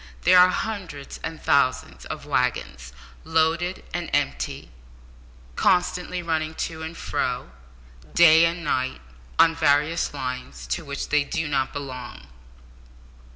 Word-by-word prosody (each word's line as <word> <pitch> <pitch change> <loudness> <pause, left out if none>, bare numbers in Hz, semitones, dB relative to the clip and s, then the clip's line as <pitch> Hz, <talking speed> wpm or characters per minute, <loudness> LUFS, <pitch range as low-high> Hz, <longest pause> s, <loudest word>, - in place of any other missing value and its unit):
There 180 +1 +7
are 180 0 +8
hundreds 180 -9 -5
of 165 -1 -6
thousands 135 -2 +1
of - - -7
waggons, - - -1 0.3
loaded 160 +3 0
and - - -3
empty, - - -2 0.8
constantly 180 0 +1
running 160 -1 -1
to 160 -1 -4
and 160 +1 -6
fro, 125 - -2 0.6
day 165 -1 +7
and 170 +1 -2
night, 130 - -1 0.4
on 165 - +6
various 155 +1 +2
lines, 130 -2 -6
to 175 - -2
which 140 -2 -5
they 150 -1 +3
do 160 +3 -3
not 135 -2 0
belong. 130 -3 -7
160 Hz, 120 wpm, -24 LUFS, 140-170 Hz, 0.8 s, are